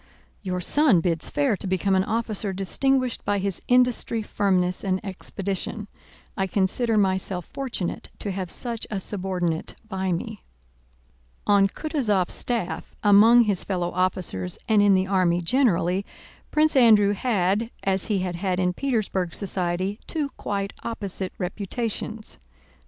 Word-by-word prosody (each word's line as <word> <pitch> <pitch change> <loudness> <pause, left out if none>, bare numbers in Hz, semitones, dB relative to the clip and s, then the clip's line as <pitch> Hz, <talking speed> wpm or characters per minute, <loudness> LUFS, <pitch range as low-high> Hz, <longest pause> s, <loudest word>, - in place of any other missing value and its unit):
Your 180 -2 -3
son 280 - +4
bids 165 -1 0
fair 280 -7 +1
to 195 - -5
become 190 +1 +1
an 190 0 +3
officer 215 -2 -2
distinguished 255 +7 0
by 205 - 0
his 195 -1 -2
industry, 245 -2 +2
firmness, 185 -3 0
and 190 -2 0
expedition. 195 +2 -4 0.5
I 195 -1 0
consider 215 +5 +1
myself 190 -3 0
fortunate 250 -10 -4
to 205 - -4
have 185 -2 -4
such 235 +2 -5
a 205 - -2
subordinate 180 -4 -3
by 190 -3 -2
me. 210 +5 -4 1.0
On 200 -1 +5
Kutúzov's 215 - -1
staff, 230 -7 -3
among 220 +4 +7
his 205 -5 0
fellow 180 -3 -2
officers 180 - -1
and 215 -2 +4
in 200 -1 +5
the 185 0 +2
army 185 -3 +2
generally, 185 -3 +2 0.5
Prince 305 0 +3
Andrew 215 -5 +6
had, 205 -1 0
as 195 -1 +1
he 210 -3 +1
had 175 -2 -3
had 185 0 -1
in 180 -1 +1
Petersburg 195 -8 -1
society, 185 +1 0
two 300 -4 -2
quite 200 -6 -4
opposite 200 -4 -4
reputations. 215 - -4
195 Hz, 135 wpm, -24 LUFS, 185-225 Hz, 1.0 s, among